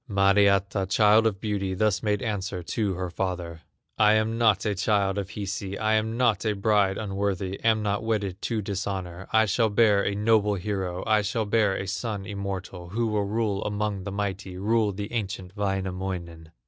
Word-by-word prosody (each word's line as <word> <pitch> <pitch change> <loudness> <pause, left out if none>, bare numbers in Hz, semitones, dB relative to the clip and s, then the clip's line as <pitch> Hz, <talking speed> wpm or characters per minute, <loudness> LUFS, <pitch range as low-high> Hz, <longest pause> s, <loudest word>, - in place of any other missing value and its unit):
Mariatta, 100 0 +3
child 105 +3 +5
of 100 -3 -2
beauty, 100 -3 -2
Thus 105 -1 +1
made 105 -2 0
answer 100 -4 -3
to 100 +2 -1
her 90 0 -4
father: 85 -3 -4 0.4
"I 105 0 +6
am 110 +1 +1
not 110 -4 +3
a 105 - +1
child 100 0 +1
of 95 -1 -5
Hisi, 100 -1 -4
I 110 0 +1
am 110 +1 0
not 120 -3 +2
a 110 -2 0
bride 100 -1 +2
unworthy, 100 -2 -2
Am 110 -1 +3
not 105 +1 -1
wedded 100 -4 -2
to 110 -3 -2
dishonor; 95 -2 -4
I 110 0 +5
shall 110 +2 +2
bear 105 -1 +4
a 100 - -1
noble 105 -1 +3
hero, 95 -2 -3
I 110 -1 +3
shall 105 +2 -1
bear 105 -2 +2
a 95 - -3
son 100 0 -3
immortal, 95 -3 -5
Who 115 +5 -1
will 105 -1 0
rule 105 -1 -1
among 105 -2 -2
the 100 - -5
mighty, 95 -2 -4
Rule 110 +2 +1
the 100 +3 -6
ancient 95 -4 -4
Wainamoinen." 95 -4 -3
100 Hz, 180 wpm, -26 LUFS, 95-110 Hz, 0.4 s, I